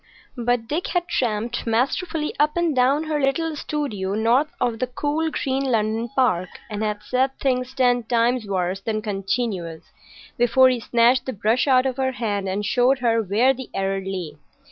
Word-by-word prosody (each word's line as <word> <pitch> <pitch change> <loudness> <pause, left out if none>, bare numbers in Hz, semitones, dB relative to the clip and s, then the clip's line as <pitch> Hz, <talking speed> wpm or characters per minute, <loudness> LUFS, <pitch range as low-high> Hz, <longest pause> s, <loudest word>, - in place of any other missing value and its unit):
But 240 -2 0
Dick 320 +7 -2
had 350 -1 -1
tramped 235 0 -2
masterfully 300 +7 0
up 300 +2 +2
and 340 -4 +1
down 265 +4 +3
her 310 -2 -1
little 315 +4 0
studio 220 -11 -3
north 240 +7 +2
of 230 -2 -1
the 255 - 0
cool 295 +5 -1
green 270 -3 -1
London 225 -1 0
park, 185 -9 +2 0.2
and 210 0 -3
had 210 -1 -2
said 260 +1 0
things 255 -1 -1
ten 245 -2 +3
times 235 0 +1
worse 185 -1 -1
than 215 0 -2
continuez, 195 -5 -3 0.6
before 260 +2 +5
he 250 -1 0
snatched 240 +3 +2
the 260 - -2
brush 220 +7 +1
out 255 -1 +4
of 260 -1 -1
her 260 -1 0
hand 205 -5 -2
and 200 +2 -2
showed 255 +3 +3
her 230 -3 +1
where 220 +6 +2
the 260 -1 -9
error 195 0 -1
lay. 180 -6 -5
245 Hz, 175 wpm, -23 LUFS, 210-265 Hz, 0.6 s, before